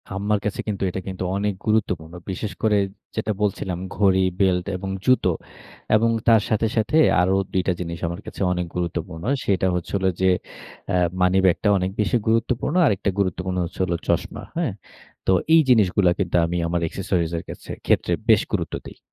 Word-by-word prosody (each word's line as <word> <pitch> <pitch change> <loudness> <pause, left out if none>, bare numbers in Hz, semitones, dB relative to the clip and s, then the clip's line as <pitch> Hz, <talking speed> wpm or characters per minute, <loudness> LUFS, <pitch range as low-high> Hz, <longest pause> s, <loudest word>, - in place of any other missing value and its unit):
আম্মার 105 +1 0
কাছে 105 - -2
কিন্তু, 100 -2 -2
এটা 90 - -4
কিন্তু, 95 -1 -4
অনেক 105 0 0
গুরুত্বপূর্ণ। 90 -7 0 0.2
বিশেষ 100 +3 -4
করে 105 -2 +4 0.4
যেটা 110 -1 -1
বলছিলাম 95 -3 -1 0.2
ঘড়ি, 95 -1 +3 0.2
বেল্ট 90 -2 +2
এবং 95 +1 -5 0.2
জুতো। 130 -8 +4 0.6
এবং 115 +2 +3 0.2
তার 115 -2 +6
সাথে, 110 +1 +2
সাথে, 110 +8 +2 0.2
আরো 95 +2 +2 0.2
২ 95 - +2
টা 95 - +3
জিনিস 85 -1 -4
আমার 85 +4 -5
কাছে - - -8
অনেক 90 -1 -1
গুরুত্বপূর্ণ। 85 -2 -4 0.2
সেটা 95 -2 +2
হচ্ছে 90 - -4
হলো 95 -1 +1
যে, 95 - +4 0.6
আ - - +2 0.3
মানি 90 +1 +4
ব্যাগটা 95 +3 +3
অনেক 95 0 -1
বেশি 105 +3 +2
গুরুত্বপূর্ণ। 115 +6 +1
আরেকটা 100 -6 +1
গুরুত্বপূর্ণ 95 -1 -1
হচ্ছে 85 - -10
হলো 90 -2 0
চশমা, - - -1
হ্যাঁ? - - 0 0.5
তো - - +5 0.2
এই 165 - +7
জিনিসগুলা 100 -6 +4
কিন্তু, 90 -3 -1
আমি 85 +1 -2
আমার 85 0 -1
এক্সেসরিজ 90 -2 -1
এর - - -5
কাছে - - -8 0.2
ক্ষেত্রে - - +2 0.2
বেশ - - +6
গুরুত্ব - - -1
দেই। - - -12
95 Hz, 175 wpm, -23 LUFS, 90-105 Hz, 0.6 s, এই